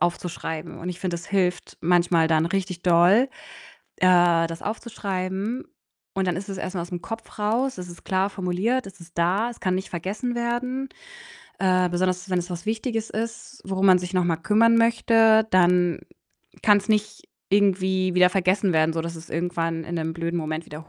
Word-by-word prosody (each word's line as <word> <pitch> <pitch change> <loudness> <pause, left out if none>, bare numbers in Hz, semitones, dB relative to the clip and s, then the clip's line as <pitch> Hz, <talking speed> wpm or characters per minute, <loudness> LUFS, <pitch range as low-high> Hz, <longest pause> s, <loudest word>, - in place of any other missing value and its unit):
aufzuschreiben 170 -2 -3
und 175 - -6
ich 175 - -8
finde, 180 -2 -2
das 170 0 -6
hilft 180 -3 -1
manchmal 170 -1 +3
dann 160 0 +2
richtig 185 -1 -3
doll, 180 +9 +5 0.7
äh, 175 -2 +4
das 165 0 -8
aufzuschreiben. 205 0 -4 0.5
Und 190 -1 0
dann 175 - 0
ist 190 +2 -6
es 195 -1 -5
erst 185 0 -5
mal 175 - -1
aus'm 175 0 -6
Kopf 225 +2 -8
raus, 230 +3 0
es 180 - -7
ist 175 - -12
klar 190 +1 0
formuliert, 195 +7 -1
es 195 -2 -12
ist 170 0 -15
da, 190 +8 +1
es 240 - -11
kann 185 -1 0
nicht 190 - -4
vergessen 205 +8 -3
werden. 250 +3 -2 0.7
Äh, 185 -1 +2
besonders, 180 +1 -1
wenn 180 - +2
es 175 0 -4
was 175 0 -5
Wichtiges 225 0 -2
ist, 230 +4 -6
worum 195 0 -2
man 185 -1 +7
sich 180 +1 -6
noch 180 -1 +2
mal 170 -2 +1
kümmern 220 +7 +3
möchte, 225 -1 +4
dann 180 -1 +3 0.6
kann's 205 0 +4
nicht 215 -1 0 0.3
irgendwie 190 -2 +2
wieder 180 0 +6
vergessen 190 +1 +1
werden, 160 0 +3
sodass 165 +1 -3
es 165 +1 -12
irgendwann 165 -1 -2
in 170 - -5
'nem 160 -1 -2
blöden 170 +1 -3
Moment 155 0 -4
wieder 155 +2 -10
185 Hz, 180 wpm, -24 LUFS, 175-210 Hz, 0.7 s, man